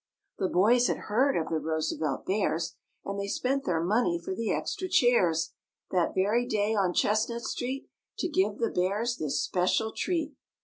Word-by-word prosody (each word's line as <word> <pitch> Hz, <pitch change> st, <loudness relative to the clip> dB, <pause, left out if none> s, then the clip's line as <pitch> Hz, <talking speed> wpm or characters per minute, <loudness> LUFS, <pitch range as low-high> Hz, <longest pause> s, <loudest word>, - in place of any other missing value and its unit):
The 190 Hz, -, +1 dB
boys 235 Hz, +8 st, +4 dB
had -, -, 0 dB, 0.2 s
heard 270 Hz, +5 st, +3 dB
of 160 Hz, -, -2 dB
the 160 Hz, -, 0 dB
Roosevelt 155 Hz, -2 st, -2 dB
Bears 175 Hz, -4 st, 0 dB, 0.3 s
And 200 Hz, 0 st, -3 dB
they 200 Hz, -, -2 dB
spent 270 Hz, +6 st, -1 dB
their 165 Hz, -2 st, 0 dB
money 185 Hz, -2 st, +2 dB
for 170 Hz, -, -5 dB
the 220 Hz, +2 st, -2 dB
extra 370 Hz, 0 st, -2 dB
chairs 185 Hz, -, +3 dB, 0.4 s
That 180 Hz, -2 st, +1 dB
very 215 Hz, +6 st, +2 dB
day 210 Hz, -1 st, +1 dB
on 195 Hz, -4 st, +2 dB
Chestnut 225 Hz, +3 st, +1 dB
Street 260 Hz, +4 st, -3 dB, 0.3 s
To -, -, -1 dB
give 205 Hz, -, +1 dB
the 230 Hz, -, 0 dB
Bears 210 Hz, +7 st, 0 dB
this 150 Hz, -3 st, -1 dB
special 185 Hz, +4 st, +1 dB
treat. 320 Hz, -1 st, -2 dB
205 Hz, 170 wpm, -28 LUFS, 180-240 Hz, 0.4 s, boys